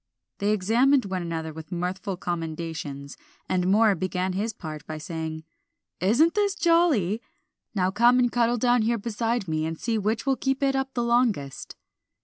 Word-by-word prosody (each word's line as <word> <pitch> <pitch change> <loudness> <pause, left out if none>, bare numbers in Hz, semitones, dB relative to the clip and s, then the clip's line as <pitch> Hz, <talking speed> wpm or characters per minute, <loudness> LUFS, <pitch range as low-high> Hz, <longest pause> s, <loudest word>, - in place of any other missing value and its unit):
They 200 - 0
examined 230 +7 +3
one 190 -2 -3
another 165 -2 -4
with 160 0 -10
mirthful 180 +2 -3
commendations, 160 -5 -5 0.3
and 180 -1 0
Moor 210 +2 +5
began 185 +1 -2
his 210 +4 -1
part 155 -7 -8
by 155 - -5
saying 160 0 -5 0.6
"Isn't 240 - +3
this 405 -2 +1
jolly? 325 - +2 0.5
Now 185 -1 +1
come 235 +5 +5
and 245 -1 +3
cuddle 240 0 +2
down 245 0 +3
here 230 +2 +1
beside 230 0 -2
me, 155 -1 -1
and 160 0 -3
see 225 -2 -1
which 215 +4 -1
will 270 -1 +2
keep 270 +1 -1
it 270 -1 +2
up 270 0 -2
the 240 - 0
longest." 235 - 0
205 Hz, 165 wpm, -26 LUFS, 170-240 Hz, 0.6 s, Moor